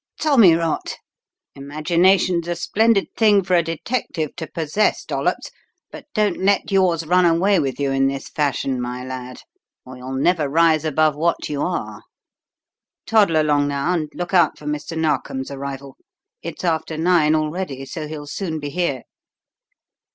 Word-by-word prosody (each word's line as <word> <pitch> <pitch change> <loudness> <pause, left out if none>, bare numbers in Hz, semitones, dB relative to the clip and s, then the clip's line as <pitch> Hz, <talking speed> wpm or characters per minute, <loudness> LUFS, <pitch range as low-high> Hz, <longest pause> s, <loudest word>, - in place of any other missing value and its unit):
"Tommy 235 - +5
rot! 165 -1 -2 0.6
Imagination's 170 +5 +1
a 175 - -1
splendid 205 +4 +1
thing 210 -3 +4
for 185 0 -2
a 170 - +5
detective 165 - -3
to 160 -2 -6
possess, 165 +7 -1
Dollops, - - -2 0.4
but - - -11
don't 210 -4 +1
let 200 +1 +1
yours 180 -4 +2
run 180 +3 +3
away 175 +3 +3
with 135 -2 -2
you 140 -1 0
in 135 0 +2
this 135 0 -4
fashion, 135 -3 -1
my 125 +1 -5
lad, 125 -1 -8 0.4
or 130 0 -10
you'll 130 +1 -7
never 150 +1 +1
rise 160 0 +3
above 155 0 +2
what 165 +3 -1
you 145 -1 -3
are. 180 - -3 1.0
Toddle 200 -8 +3
along 145 -2 +2
now, 140 +5 -1
and 155 -4 -2
look 175 +1 -5
out 175 -4 +3
for 150 - -14
Mr. 150 +2 -4
Narkom's 140 -4 -2
arrival. 140 -1 -7 0.5
It's 170 +1 -7
after 160 -2 -1
nine 160 -2 +3
already, 155 -3 -3
so 155 +3 -6
he'll 150 -1 -7
soon 160 +1 -4
be 145 -1 -6
here." 145 -6 -2
160 Hz, 155 wpm, -21 LUFS, 140-180 Hz, 1.0 s, Tommy